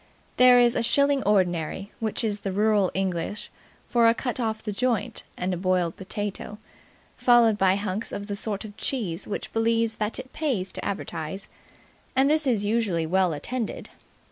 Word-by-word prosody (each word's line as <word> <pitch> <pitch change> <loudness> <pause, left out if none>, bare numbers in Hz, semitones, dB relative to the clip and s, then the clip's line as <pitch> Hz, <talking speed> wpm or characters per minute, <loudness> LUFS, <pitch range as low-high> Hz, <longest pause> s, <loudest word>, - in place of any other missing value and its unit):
On - - -31
Saturdays - - -33
there 250 -1 +7
is 240 -1 +5
a - - +1
"shilling 280 +4 +3
ordinary" 185 -1 0
which 220 +1 -2
is 205 -2 -2
rural 205 0 +2
English 190 +1 -2 0.4
for 235 -1 +4
a 230 - +4
cut 250 0 -3
off 220 -2 -2
the 210 - -3
joint 235 +1 -1
and 185 +1 -1
a - - -2
boiled 180 -2 0
potato, 205 +1 -5 0.6
followed 240 -3 +5
by 190 -2 +3
hunks 200 +1 -3
of 200 - -5
the 205 -1 -4
sort 205 0 -3
of 205 -1 -10
cheese 200 -10 -2
which 205 - -5
believes 225 0 +1
that 210 +1 -2
it 260 0 -9
pays 250 -12 -1
to - - -7
advertise, 190 -1 -4 0.7
and 270 +2 +4
this 310 -2 +1
is 220 -5 +1
usually 205 -7 0
well 185 +2 +2
attended. 225 - -4
210 Hz, 175 wpm, -25 LUFS, 190-235 Hz, 0.7 s, there